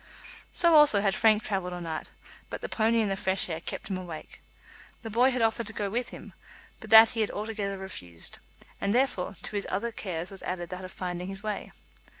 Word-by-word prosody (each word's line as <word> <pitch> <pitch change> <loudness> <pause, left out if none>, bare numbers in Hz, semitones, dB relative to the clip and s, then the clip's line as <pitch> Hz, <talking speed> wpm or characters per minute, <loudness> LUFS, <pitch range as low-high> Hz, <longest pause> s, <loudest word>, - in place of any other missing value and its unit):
So 340 -2 +4
also 295 -10 +7
had 195 -1 +2
Frank 215 0 +4
travelled 190 -3 -2
all 175 - -5
night, 165 -2 -5 0.4
but - - -5
the - - -3
pony 225 +1 +2
and 210 -3 0
the - - +1
fresh 190 -1 0
air 160 -1 -3
kept - - -5
him 190 -2 -3
awake. 170 -4 -9 0.6
The 225 - -6
boy 245 +4 +4
had 250 -3 0
offered 225 0 +1
to 220 - -6
go 205 -2 -2
with 245 +3 -1
him, - - -11 0.5
but - - -10
that 225 0 +10
he 225 - -2
had 215 - +1
altogether 205 -2 -3
refused; 90 - -8 0.4
and, 200 +3 +1
therefore, 240 -7 +1
to - - -4
his 200 - -2
other 215 +5 -1
cares 180 -4 -4
was 195 - -7
added 175 -2 -4
that 185 +1 -6
of 185 - -7
finding 180 -1 -4
his 195 +1 -6
way. 215 -1 -4
200 Hz, 215 wpm, -28 LUFS, 185-225 Hz, 0.6 s, that